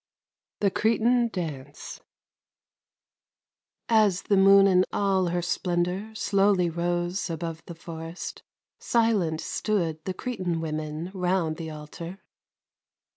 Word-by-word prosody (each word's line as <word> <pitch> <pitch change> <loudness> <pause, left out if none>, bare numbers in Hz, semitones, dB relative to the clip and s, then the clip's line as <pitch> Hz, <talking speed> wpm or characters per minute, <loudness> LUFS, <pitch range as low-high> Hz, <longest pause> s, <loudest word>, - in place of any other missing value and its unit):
THE 200 -2 +3
CRETAN 235 +3 +2
DANCE 150 -9 -6 1.9
As 215 -5 +3
the 205 - +2
moon 195 0 +7
in 185 -2 +5
all 195 -2 +1
her 175 0 -1
splendor 180 +3 -1
Slowly 195 -4 +2
rose 175 +2 -1
above 165 0 -4
the 170 - -7
forest, 165 +1 -7 0.4
Silent 210 -9 +1
stood 170 -7 -1
the 185 - -3
Cretan 185 -10 -3
women 155 +2 -4
Round 180 -4 0
the 165 -1 -5
altar. 155 +4 -8
180 Hz, 105 wpm, -26 LUFS, 165-200 Hz, 1.9 s, moon